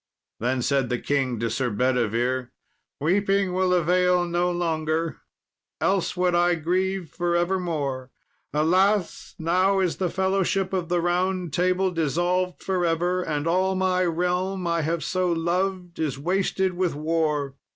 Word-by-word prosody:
Then 125 +2 0
said 135 -2 +1
the 125 - 0
king 130 -3 -1
to 115 - 0
Sir 130 0 -1
Bedivere, 125 +2 0 0.5
"Weeping 195 +3 +1
will 185 0 +1
avail 180 +1 +3
no 175 +1 0
longer, 160 -3 -1 0.6
else 190 -2 0
would 180 0 +2
I 175 0 +3
grieve 180 +2 -1
for 175 0 -1
evermore. 165 -8 -1 0.4
Alas! 185 +5 +1
now 185 +4 +2
is 185 -3 0
the 185 -2 0
fellowship 190 +1 0
of 180 -3 -1
the 175 -1 +1
Round 180 -1 0
Table 185 +1 +1
dissolved 175 +3 -1
for 185 -2 0
ever, 175 +2 +1
and 150 -4 -2
all 185 +3 +1
my 185 -1 +1
realm 180 +2 -1
I 170 -1 +1
have 165 +2 -1
so 185 -1 0
loved 180 +1 -1
is 150 -5 -1
wasted 190 +4 0
with 180 -3 -1
war. 150 -2 -1
175 Hz, 140 wpm, -25 LUFS, 155-185 Hz, 0.6 s, avail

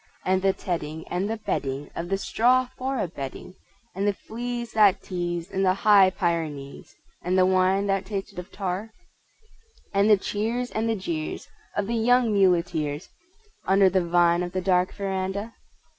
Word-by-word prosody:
And 185 0 +2
the 195 0 +3
tedding 160 -4 -5
and 185 +4 -1
the 225 - -2
bedding 140 -9 -3
Of 170 +1 -4
the 195 - +1
straw 250 +5 +2
for 265 +1 -2
a 215 - -1
bedding, 140 +2 -8 0.4
And 195 +2 -1
the 205 - +2
fleas 240 +1 -5
that 210 -3 +4
tease 175 -2 -4
in 190 0 -1
the 185 -1 +3
High 200 -2 +6
Pyrenees, 165 -7 -3 0.3
And 180 +2 0
the 185 - +5
wine 185 +1 +2
that 195 -1 -1
tasted 200 -2 -5
of 180 - -9
tar? 195 +2 -3 1.0
And 200 +2 +3
the 210 - +7
cheers 225 +6 -2
and 220 +1 -1
the 225 - +1
jeers 165 -6 -4 0.3
of 205 - +1
the 230 - -3
young 235 0 +3
muleteers 170 -5 +1 0.6
(Under 195 0 +5
the 185 -1 +2
vine 175 0 +3
of 175 0 -4
the 185 - -1
dark 180 0 +2
veranda)? 195 +2 -3
190 Hz, 170 wpm, -25 LUFS, 175-210 Hz, 1.0 s, the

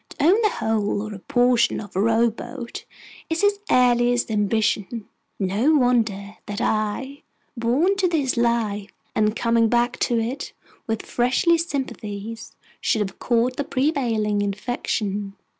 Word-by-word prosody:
To - - -4
own 390 +7 +5
the 425 - +4
whole 215 - -1
or 215 -1 -6
a 200 - -8
portion 245 0 +2
of 205 -4 -10
a 190 - +2
row 230 +1 +3
boat 240 +2 -8 0.4
is 325 0 0
his 405 0 +3
earliest 245 -1 +3
ambition. 210 +1 0 0.3
No 210 +11 +2
wonder 220 -6 +1
that 205 0 -4
I, 220 +7 -1 0.3
born 260 +12 +2
to 385 -2 +2
this 300 -7 0
life, 225 -4 0 0.2
and 215 0 +1
coming 230 -1 +2
back 240 +1 +1
to 235 -2 +1
it 245 +5 -4 0.3
with 225 -1 -2
freshest 330 +8 +2
sympathies, 225 -4 -5 0.2
should 220 - +1
have 195 -2 -4
caught 245 +1 +1
the 285 - 0
prevailing 240 -8 0
infection. 205 -1 -2
230 Hz, 140 wpm, -23 LUFS, 210-255 Hz, 0.4 s, own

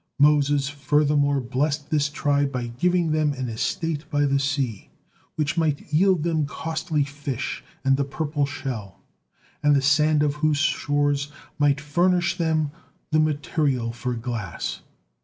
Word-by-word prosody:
Moses 145 -1 +4
furthermore 145 0 +2
blessed 140 +4 -2
this 150 -1 +2
tribe 145 -2 +1
by 120 -3 -3
giving 175 -1 +2
them 155 -1 +2
an 130 -2 -4
estate 150 +7 -2
by 145 0 +2
the 140 0 +2
sea, 135 -7 -2 0.5
which 155 +2 0
might 150 -2 -1
yield 185 0 +4
them 160 -3 0
costly 160 0 -2
fish 140 -2 -5 0.2
and 135 0 +4
the 140 - +1
purple 145 +1 -2
shell, 125 -8 -6 0.6
and 145 0 +4
the - - +4
sand 150 +1 +4
of 145 -1 +1
whose 155 -1 +2
shores 145 -1 +1 0.3
might 145 -1 +3
furnish 175 +4 +1
them 160 -4 0 0.4
the 155 - +3
material 145 -5 0
for 125 +1 -3
glass. 115 -6 -4
145 Hz, 140 wpm, -24 LUFS, 140-155 Hz, 0.6 s, Moses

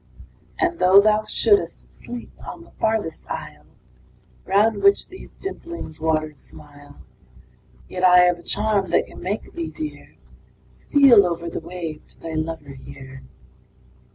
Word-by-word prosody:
III. 365 - +4
And 340 -1 -8
though 185 +2 +7
thou 215 +1 +3
shouldst 405 -1 +1
sleep 240 -1 -9
on - - -9
the - - -19
farthest 220 -7 -1
isle, - - -7 0.8
Round 205 +2 +2
which 200 0 +4
these 375 - -12
dimpling 340 - -7
waters 155 -2 -1
smile 145 -1 -13 0.9
Yet 180 - -5
I 180 -1 +8
have 180 -1 +3
a - - -12
charm 205 0 0
that - - +2
can - - -13
make 200 +4 -4
thee, 335 -1 -4
dear, 310 -1 -8 0.6
Steal 270 -8 +6
over 170 -1 -3
the - - -4
wave 165 -4 -7
to - - -19
thy 165 -1 -7
lover 155 -2 -4
here. 135 0 -12
185 Hz, 145 wpm, -22 LUFS, 160-220 Hz, 0.9 s, I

